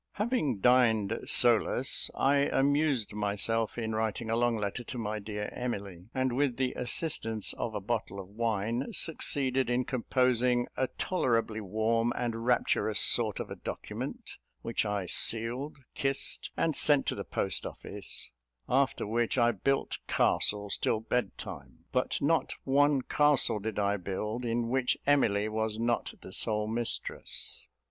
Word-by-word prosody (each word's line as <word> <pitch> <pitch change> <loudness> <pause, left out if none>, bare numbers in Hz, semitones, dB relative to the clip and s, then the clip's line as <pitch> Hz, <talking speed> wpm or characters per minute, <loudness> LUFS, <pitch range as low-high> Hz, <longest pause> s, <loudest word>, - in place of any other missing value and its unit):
Having 205 - -1
dined 115 -4 +3
solus, 120 +2 +4
I 140 +1 +3
amused 140 -3 +1
myself 105 +2 -1
in 110 -2 -3
writing 110 +1 -2
a - - +2
long 120 0 +1
letter 105 +3 -3
to 125 - -7
my 110 -2 -3
dear 105 0 -5
Emily; 100 -6 -5
and 130 -1 -1
with 135 -3 0
the 130 -1 0
assistance 120 -5 0
of 110 -2 -4
a - - -1
bottle 110 -1 -3
of 95 - -8
wine, 115 +3 -1
succeeded 135 -5 +1
in 125 +1 +1
composing 125 -1 +2
a 130 - 0
tolerably 115 -12 -1
warm 110 +3 0
and 115 -1 -3
rapturous 110 -3 +2
sort 110 -4 +4
of - - -6
a - - -4
document, - - -7 0.3
which 115 -1 -1
I 100 -2 -2
sealed, 120 - 0 0.2
kissed, 135 0 +1
and 160 -3 +1
sent 145 -2 +5
to - - -1
the - - -5
post 95 -4 -1
office; - - -6 0.4
after 135 +1 +1
which, 115 +4 0
I 120 -1 +4
built 135 +6 -1
castles 105 -1 +1
till 110 - 0
bed 125 +2 -2
time; 85 - -10
but 130 0 0
not 160 +3 +1
one 140 0 +3
castle 145 -7 +2
did 110 +1 -5
I 100 0 +1
build, 105 +6 -4
in 115 0 -1
which 130 0 +1
Emily 110 -8 +2
was 110 0 -2
not 115 +1 -1
the - - -10
sole 105 -1 +1
mistress. 115 +1 -1
115 Hz, 150 wpm, -30 LUFS, 110-130 Hz, 0.4 s, sent